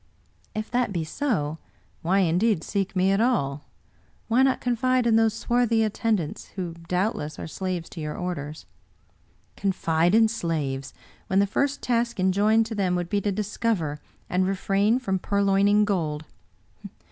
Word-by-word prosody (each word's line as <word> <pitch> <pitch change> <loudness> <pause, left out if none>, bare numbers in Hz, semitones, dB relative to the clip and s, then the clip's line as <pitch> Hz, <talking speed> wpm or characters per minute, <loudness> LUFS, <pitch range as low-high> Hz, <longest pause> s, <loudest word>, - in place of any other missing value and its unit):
" - - -39
If 215 0 -4
that 245 -3 +1
be 170 -4 -1
so, 160 - -2 0.4
why, 185 +3 +2
indeed, 180 +1 +2
seek 200 -1 -2
me 185 +1 +3
at 195 +2 +2
all? 150 - 0 0.6
Why 235 +3 +4
not 265 -1 +3
confide 250 +1 +1
in 230 -2 +4
those 225 -1 +3
swarthy 235 -1 +2
attendants, 215 -6 -1
who 180 -4 -4
doubtless 180 -5 -1
are - - -6
slaves 180 0 -4
to 165 - -8
your 150 0 -4
orders?" 155 -4 -5 0.5
" - - -37
Confide 175 -2 +1
in 225 0 +6
slaves, 155 - -3 0.3
when 190 - 0
the 200 - +5
first 280 +7 -1
task 235 -2 0
enjoined 205 +4 +3
to 225 - -5
them 190 -4 0
would 175 -1 -2
be 200 +1 +1
to 205 - 0
discover, 200 -6 -1 0.3
and 185 +1 +1
refrain 195 +3 +2
from 195 -7 -1
purloining 200 +1 +3
gold! 160 -6 -1
195 Hz, 160 wpm, -25 LUFS, 175-225 Hz, 0.6 s, in